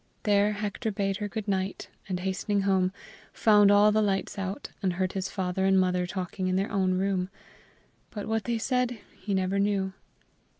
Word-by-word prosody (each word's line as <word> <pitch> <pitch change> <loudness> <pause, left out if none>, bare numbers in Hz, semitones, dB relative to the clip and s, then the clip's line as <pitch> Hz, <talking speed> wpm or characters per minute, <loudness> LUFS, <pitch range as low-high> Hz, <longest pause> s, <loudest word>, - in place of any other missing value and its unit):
There 205 -1 +3
Hector 210 +1 -3
bade 195 -1 -1
her 210 -1 -3
goodnight, 195 -3 -3 0.2
and, 180 -1 -2
hastening 195 +2 0
home, 190 -2 +2 0.4
found 210 -2 +5
all 205 +1 +6
the 215 +1 +3
lights 195 -1 -1
out, 195 +1 -4
and 185 -2 +1
heard 185 +1 -1
his 190 0 -2
father 190 -1 -2
and 190 0 +4
mother 180 -1 +1
talking 185 0 -3
in 185 - +1
their 195 +2 0
own 190 -2 +1
room; 190 -1 0 0.8
but 210 -2 -6
what 220 -1 -1
they 235 -1 0
said 250 +1 0 0.2
he 200 -2 -3
never 190 +1 0
knew. 200 -1 +1
195 Hz, 175 wpm, -28 LUFS, 185-210 Hz, 0.8 s, all